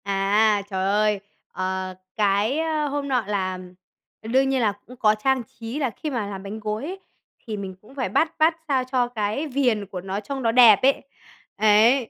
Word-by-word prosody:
À, 200 +2 +2
trời 190 -1 -2
ơi! 210 +1 +2 0.3
Ờ, 185 0 -3 0.2
cái, 210 +5 +2
a, 315 -2 0
hôm 285 0 -3
nọ 255 -4 +1
là 185 -3 -2 0.6
ờ, 220 - -10
đương 265 +3 +3
nhiên 265 -1 +1
là 215 -3 +3
cũng 250 - -12
có 215 -3 +3
trang 260 +3 0
trí 230 +4 -7
là 270 -4 0
khi 300 +7 -6
mà 235 -7 -2
làm 195 -1 -7
bánh 205 +2 -6
gối 215 +2 -3
ấy 375 +4 -6 0.5
thì 215 -2 -4
mình 190 -2 -6
cũng 225 +6 -18
phải 260 -8 -2
bắt 320 - +1
bắt 320 +1 +4
sao 265 -3 +1
cho 250 -2 +2
cái 225 +5 -2
viền 250 -7 +1
của 185 -2 -7
nó 190 +2 -4
trong 265 +6 -5
nó 230 - +3
đẹp 230 -4 +8
ấy. 270 +1 +3 0.5
Ấy. 220 +4 +4
220 Hz, 205 wpm, -24 LUFS, 200-265 Hz, 0.6 s, đẹp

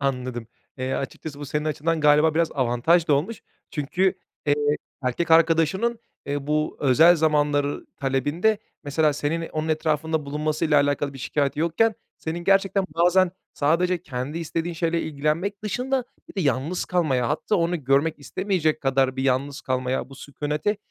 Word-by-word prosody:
Anladım. 125 -4 -2 0.3
Eee, 130 +1 -2
açıkçası 145 +2 -5
bu 145 - -5
senin 150 +2 -2
açından 155 +1 -1
galiba 150 +1 +4
biraz 165 0 +1
avantaj 135 +7 +2
da 145 - +5
olmuş. 185 +10 -2 0.3
Çünkü, 175 +6 0 0.3
eee, 145 - +4 0.5
erkek 130 +7 -1
arkadaşının, 165 +8 +3 0.3
ııı, 140 0 -2
bu 150 +1 0
özel 160 +6 +6
zamanlar 145 -2 +1 0.2
talebinde 145 - +1 0.3
mesela 150 +1 +2
senin 160 +3 -2
onun 155 0 -3
etrafında 155 0 0
bulunmasıyla 150 +1 +1
alakalı 145 0 -1
bir 135 - -10
şikâyeti 140 +2 -1
yokken 170 +8 +2 0.2
senin 160 +1 -4
gerçekten 195 0 +3
bazen 180 +2 +4 0.2
sadece 170 +4 +1
kendi 135 +3 -4
istediğin 165 +1 -3
şeyle 165 0 0
ilgilenmek 160 +7 -2
dışında 250 +4 -1 0.2
bir - - -13
de 195 - -1
yalnız 145 +3 0
kalmaya 140 -9 +1
hatta 155 +7 0
onu 170 -3 -1
görmek 140 +5 +2
istemeyecek 160 +1 -1
kadar 135 -1 +1
bir 130 - -1
yalnız 135 +2 0
kalmaya 130 0 -2
bu 135 - -12
sükûnete 150 +8 -2
155 Hz, 150 wpm, -24 LUFS, 140-170 Hz, 0.5 s, özel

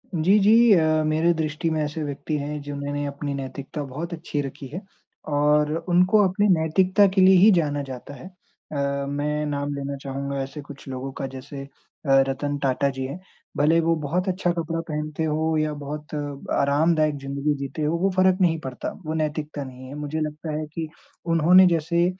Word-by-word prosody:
जी, 175 +6 +4
जी। 225 +3 +6
अ, 155 -3 +3
मेरे 160 +3 +2
दृष्टि 160 +1 -2
में 160 -1 0
ऐसे 150 +1 -3
व्यक्ति 145 +1 -4
हैं 145 +1 -4
जिन्होंने 145 0 -4
अपनी 140 0 -4
नैतिकता 140 +2 -5
बहुत 155 +6 -6
अच्छी 155 -2 -3
रखी 135 0 -7
है 160 +9 -6 0.5
और 150 +1 +3 0.2
उनको 185 +4 +5
अपनी 205 +3 +1
नैतिकता 185 +5 +3
के 190 - +5
लिए 190 +1 +7
ही 205 +5 +7
जाना 150 -6 +1
जाता 130 +2 -8
है। 140 - -11
अ, 140 -6 -5
मैं 150 +1 -1
नाम 145 -1 -2
लेना 140 0 -4
चाहूँगा 140 0 -3
ऐसे 135 +2 -6
कुछ 140 -1 -12
लोगों 135 +1 -5
का 135 - -2
जैसे 135 +1 -8 0.4
अ, - - -3 0.2
रतन 145 +2 -2
टाटा 135 +1 +1
जी 135 -1 -4
हैं। 140 +7 -6 0.4
भले 150 +3 +4
ही 165 - +4
वो 165 0 +2
बहुत 180 +7 -1
अच्छा 180 -1 0
कपड़ा 165 0 -2
पहनते 150 +1 -3
हो 160 +1 0
या 155 0 0
बहुत 150 +2 -7 0.4
आरामदायक 155 +2 +2
ज़िंदगी 140 +2 -1
जीते 140 +3 -5
हो, 155 +3 +1
वो 190 +3 +1
फ़र्क 185 0 +4
नहीं 165 -3 +3
पड़ता, 130 -4 -5
वो 155 - -2
नैतिकता 155 -1 -3
नहीं 130 -1 -10
है, 135 - -8
मुझे 150 +1 -4
लगता 155 +1 -4
है 155 - -3
कि 160 -1 -3 0.5
उन्होंने 175 +3 +7
जैसे 170 0 +1
150 Hz, 185 wpm, -24 LUFS, 140-165 Hz, 0.5 s, लिए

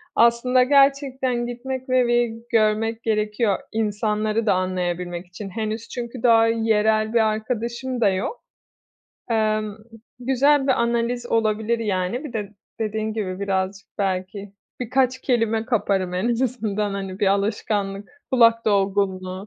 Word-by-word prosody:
Aslında 235 +2 +4
gerçekten 270 -2 +2
gitmek 260 +2 -5
ve 255 -1 +3
bir 240 -1 +2 0.2
görmek 225 +1 +1
gerekiyor 210 -1 0
insanları 215 0 -1
da 210 - +4
anlayabilmek 180 -1 -2
için 195 +3 -8
henüz 220 +2 -4
çünkü 240 -1 -6
daha 230 -2 +5
yerel 220 -1 +2
bir 235 - +4
arkadaşım 235 +3 -3
da 210 - +5
yok. 190 - -3 0.9
Emm, 215 -2 0 0.4
güzel 270 +3 +3
bir 270 - +4
analiz 235 +1 -1
olabilir, 220 0 +1
yani. 205 +4 -2
Bir 290 - -7
de 210 -3 -4 0.3
dediğin 220 0 -2
gibi, 195 -4 -4
birazcık 195 0 -2
belki 195 +1 -3 0.3
birkaç 255 +1 +1
kelime 225 -4 +1
kaparım 195 -6 0
en 185 +6 0
azından, 220 -5 -1
hani, 195 -1 -5
bir 205 - +1
alışkanlık, 200 0 -1 0.2
kulak 230 -3 +4
dolgunluğu 195 -2 0
220 Hz, 125 wpm, -23 LUFS, 200-240 Hz, 0.9 s, daha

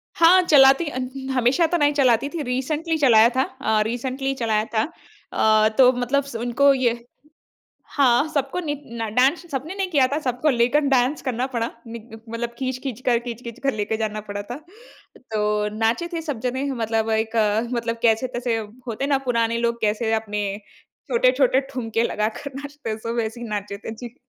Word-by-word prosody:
हाँ, 350 +3 +6
चलाती 275 -1 +6
अन् 260 +1 -5
हमेशा 255 +6 +2
तो 345 - 0
नहीं 290 -1 +3
चलाती 260 -2 +2
थी। 325 0 -5
रिसेंट्ली 295 +6 -1
चलाया 235 -6 +6
था 260 - +3
अ, 220 -6 -1
रिसेंट्ली 260 +4 -2
चलाया 220 -3 0
था। 220 - +2 0.5
अ, 215 0 +4
तो 255 -1 +7
मतलब 255 +3 0
स 275 -4 -10
उनको 245 +4 +3
ये 240 -2 0 0.9
हाँ, 270 +1 +4
सबको 280 +5 -1
नि 295 -4 -2 0.3
न 225 - -1
डान्स 270 +8 +3
सबने 285 +7 -4
नहीं 390 -2 -2
किया 280 -6 +4
था। 295 - +1
सबको 250 +2 -1
लेकर 245 +3 +3
डाँस 255 +4 +1
करना 255 -1 -1
पड़ा। 235 -3 -3 0.2
निग 230 0 -9 0.2
मतलब 235 +1 -4
खींच-खींच 255 -2 -4
कर, 240 -2 +4
खींच-खींच 235 -1 -8
कर 275 - +1
लेके 215 +1 -2
जाना 215 -1 -3
पड़ा 205 0 -4
था। 240 +5 -7 0.6
तो 210 -3 -1
नाचे 225 +10 0
थे 330 - -3
सब 295 -8 -4
जने, 255 +3 -2
मतलब 225 -2 -1
एक 220 +1 -1
अ, 215 -1 +2
मतलब 230 -1 -2
कैसे-तैसे 240 +1 +1 0.3
होते 235 +3 -3
हैं - - -1
ना, 275 - +3
पुराने 230 -1 +1
लोग 235 0 -1
कैसे 220 +1 0
अपने 210 -2 -2 0.6
छोटे-छोटे - - +3
ठुमके 230 -3 -2
लगाकर 220 +5 -2
नाचते 285 -3 -7
हैं, 215 - -3
सब 230 +1 -4
वैसे 225 +1 -3
ही 240 - -5
नाचे 205 -1 -4
थे। 220 - -7
जी। 240 +1 -9
245 Hz, 180 wpm, -22 LUFS, 225-275 Hz, 0.9 s, तो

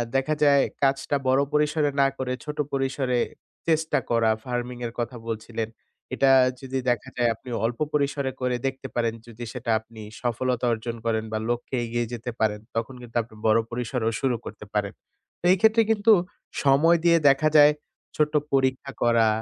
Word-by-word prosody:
দেখা 135 +3 +1
যায় 140 -1 +5 0.2
কাজটা 135 +1 +1
বড় 130 +1 +4
পরিসরে 150 0 +2
না 135 - +5
করে 130 -1 -2
ছোট 150 0 -5 0.2
পরিসরে 135 -2 0 0.5
চেষ্টা 160 -1 +2
করা, 115 -1 +3 0.2
ফারমিং 125 0 -3
এর 115 - -9
কথা 120 +1 -3
বলছিলেন। 110 0 -4 0.5
এটা 135 -1 +4 0.3
যদি 135 0 -3
দেখা 120 -4 -1
যায় 120 -1 +3
আপনি 125 - -13 0.2
অল্প 115 0 -2
পরিসরে 140 -2 0
করে 125 -1 0
দেখতে 135 0 -5
পারেন, 115 -1 +1
যদি 115 +1 -9
সেটা 125 -2 -3
আপনি 110 0 -14 0.2
সফলতা 125 0 -1
অর্জন 115 +1 -4
করেন 110 -1 0
বা 110 - 0
লক্ষ্যে 120 +2 -2
এগিয়ে 120 +1 -1
যেতে 120 +1 -4
পারেন 105 -1 +1 0.2
তখন 115 +3 -2
কিন্তু 120 -1 -6
আপনি 110 -1 -17
বড় 110 +1 +5
পরিসরেও 120 -1 -1
শুরু 130 -3 +1
করতে 105 0 -9
পারেন। 105 -1 -1 0.5
তো - - -6
এক্ষেত্রে 220 +4 +4
কিন্তু 220 +1 +4 0.5
সময় 145 +5 +5
দিয়ে 170 -1 +6
দেখা 140 +3 +3
যায় 145 0 +8 0.4
ছোট্ট 150 0 +1 0.2
পরীক্ষা 130 0 +1
করা, 115 -1 +4
125 Hz, 165 wpm, -25 LUFS, 115-140 Hz, 0.5 s, যায়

